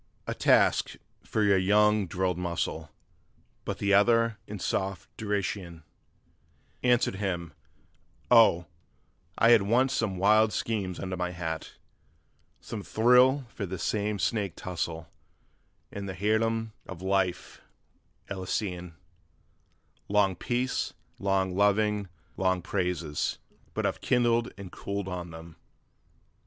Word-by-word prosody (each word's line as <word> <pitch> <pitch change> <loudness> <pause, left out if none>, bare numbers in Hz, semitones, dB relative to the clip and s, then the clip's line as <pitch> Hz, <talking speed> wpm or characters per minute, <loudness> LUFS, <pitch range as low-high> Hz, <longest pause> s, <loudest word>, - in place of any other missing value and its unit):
'A - - -2
task - - +3 0.3
for 110 - -1
your 100 -2 +4
young 105 +1 +3
drilled 90 -1 -1
muscle!' 85 -2 -3 0.8
But - - -3
the 100 0 +1
other, 115 +2 +4
in 105 - -6
soft 95 -1 -3
derision 100 -5 -3 1.0
Answered 120 -5 +2
him: 90 -5 -3 0.8
'Oh, 110 -8 +6 0.7
I 115 - +5
had 115 -3 +7
once 125 +7 +2
some 105 -8 -1
wild 105 +3 +4
schemes 100 -6 -2
under 95 -1 -4
my 90 0 -2
hat: 80 -2 -5 0.9
Some 110 - -6
thrill 125 +6 +4
for 100 -2 -5
this 95 0 -5
same 105 0 -1
snake 95 +1 -1
tussle, 85 -2 -4 0.8
and 100 -1 -6
the 95 - -5
heirdom 110 +2 0 0.2
of 95 -1 -8
life 95 -2 -1 0.7
Elysian, 90 -2 -4 1.1
Long 100 -2 +2
peace, 125 +6 -2 0.2
long 95 -2 0
loving, 105 0 +2 0.3
long 95 -2 +1
praises: 90 -6 -2 0.4
but - - -1
I've - - -1
kindled 120 -1 +2
and 100 -2 -9
cooled 100 -1 -4
on 90 -2 -5
that! 80 0 -10
100 Hz, 115 wpm, -28 LUFS, 90-110 Hz, 1.1 s, had